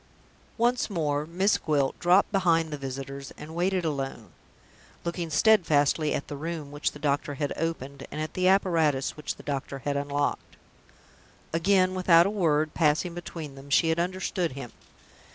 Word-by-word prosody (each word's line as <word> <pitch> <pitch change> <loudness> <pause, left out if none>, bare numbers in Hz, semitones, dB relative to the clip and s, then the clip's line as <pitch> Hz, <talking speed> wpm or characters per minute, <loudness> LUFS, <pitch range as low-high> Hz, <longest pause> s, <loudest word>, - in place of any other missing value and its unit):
Once 240 +1 +1
more, 150 -5 -1
Miss 190 +5 +2
Gwilt 145 -4 0
dropped 180 +3 +4
behind 165 -5 +2
the - - -3
visitors, 135 0 -6
and 155 +1 -9
waited 180 +1 0
alone 135 - -4 0.7
looking 170 -1 -3
steadfastly 155 -5 +3
at - - -4
the 145 - -6
Room 155 -1 -5
which 145 0 -2
the - - -9
doctor 145 -1 -1
had 145 0 -2
opened, 140 -4 -4
and 150 - -6
at 155 0 -4
the 185 0 +1
apparatus 165 -8 +2
which 150 - -4
the - - -14
doctor 140 -1 -3
had 145 -1 0
unlocked. 145 0 -2 1.0
Again, 185 +2 +3
without 175 -2 +5
a 200 - 0
word 155 -6 +1
passing 165 +2 +1
between 165 -4 -7
them, 135 +1 -12
she 160 +3 +4
had 160 +1 +1
understood 180 -2 -1
him. 130 -3 -7
155 Hz, 160 wpm, -27 LUFS, 145-175 Hz, 1.0 s, without